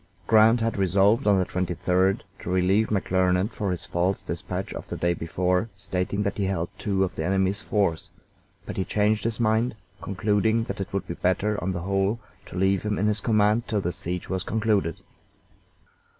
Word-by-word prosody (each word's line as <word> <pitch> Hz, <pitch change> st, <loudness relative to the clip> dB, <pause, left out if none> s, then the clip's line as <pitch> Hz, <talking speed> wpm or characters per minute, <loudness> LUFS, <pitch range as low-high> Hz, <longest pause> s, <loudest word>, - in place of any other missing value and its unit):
Grant 110 Hz, +2 st, +5 dB
had 115 Hz, -1 st, 0 dB
resolved 100 Hz, +6 st, +3 dB
on 100 Hz, -1 st, +5 dB
the 95 Hz, -, +2 dB
23d 90 Hz, +2 st, 0 dB, 0.2 s
to -, -, -7 dB
relieve 95 Hz, +4 st, +2 dB
McClernand 95 Hz, 0 st, +1 dB
for 105 Hz, -2 st, -3 dB
his 90 Hz, +2 st, -2 dB
false 90 Hz, 0 st, 0 dB
dispatch -, -, -4 dB
of -, -, -7 dB
the -, -, -5 dB
day 85 Hz, 0 st, +1 dB
before 90 Hz, +5 st, 0 dB
stating 95 Hz, +2 st, -2 dB
that 100 Hz, 0 st, -2 dB
he 100 Hz, -, +1 dB
held 85 Hz, -3 st, -1 dB
two 95 Hz, -2 st, +1 dB
of 95 Hz, -, -2 dB
the 80 Hz, -, -4 dB
enemy's 95 Hz, +3 st, +1 dB
forts, 100 Hz, -8 st, 0 dB, 0.6 s
but -, -, -6 dB
he 95 Hz, -, +1 dB
changed 105 Hz, +2 st, +1 dB
his 115 Hz, 0 st, -2 dB
mind, 110 Hz, +1 st, +1 dB, 0.3 s
concluding 105 Hz, +3 st, +1 dB
that 100 Hz, -3 st, -5 dB
it 95 Hz, -, -5 dB
would 100 Hz, -, -2 dB
be -, -, -3 dB
better 100 Hz, +4 st, 0 dB
on 95 Hz, -, 0 dB
the 85 Hz, -2 st, -3 dB
whole 100 Hz, +4 st, 0 dB, 0.3 s
to -, -, -8 dB
leave 95 Hz, 0 st, +2 dB
him 105 Hz, -1 st, -2 dB
in 105 Hz, -, 0 dB
his 105 Hz, -1 st, +1 dB
command 110 Hz, +1 st, +2 dB
till 105 Hz, -, 0 dB
the 90 Hz, -, -1 dB
siege 90 Hz, +1 st, -4 dB
was 95 Hz, 0 st, -2 dB
concluded. 105 Hz, -6 st, 0 dB
95 Hz, 190 wpm, -25 LUFS, 90-105 Hz, 0.6 s, Grant